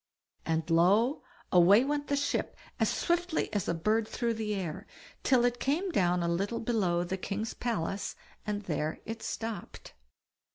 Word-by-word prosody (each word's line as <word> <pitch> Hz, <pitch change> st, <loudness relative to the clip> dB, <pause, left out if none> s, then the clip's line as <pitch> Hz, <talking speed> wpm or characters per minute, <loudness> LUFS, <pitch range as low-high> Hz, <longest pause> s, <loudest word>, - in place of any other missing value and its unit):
And 160 Hz, -1 st, 0 dB
lo! 195 Hz, -, +3 dB, 0.3 s
away 185 Hz, +6 st, +7 dB
went 290 Hz, 0 st, -1 dB
the 285 Hz, -, +1 dB
ship 285 Hz, 0 st, -1 dB, 0.2 s
as -, -, +3 dB
swiftly 345 Hz, -1 st, 0 dB
as 205 Hz, -3 st, -1 dB
a 170 Hz, -, +1 dB
bird 215 Hz, +6 st, +1 dB
through 235 Hz, 0 st, -1 dB
the 215 Hz, -2 st, -2 dB
air, 175 Hz, -6 st, -4 dB, 0.3 s
till 250 Hz, -2 st, +4 dB
it 245 Hz, 0 st, 0 dB
came 335 Hz, +10 st, 0 dB
down 180 Hz, -, +2 dB
a -, -, 0 dB
little 195 Hz, +7 st, -1 dB
below 190 Hz, -7 st, +1 dB
the 180 Hz, +2 st, -3 dB
king's 210 Hz, +4 st, -3 dB
palace, 205 Hz, -5 st, -2 dB, 0.3 s
and 210 Hz, 0 st, -3 dB
there 155 Hz, -3 st, -2 dB
it 225 Hz, 0 st, -5 dB
stopped. 225 Hz, -5 st, -6 dB
210 Hz, 160 wpm, -30 LUFS, 175-240 Hz, 0.3 s, away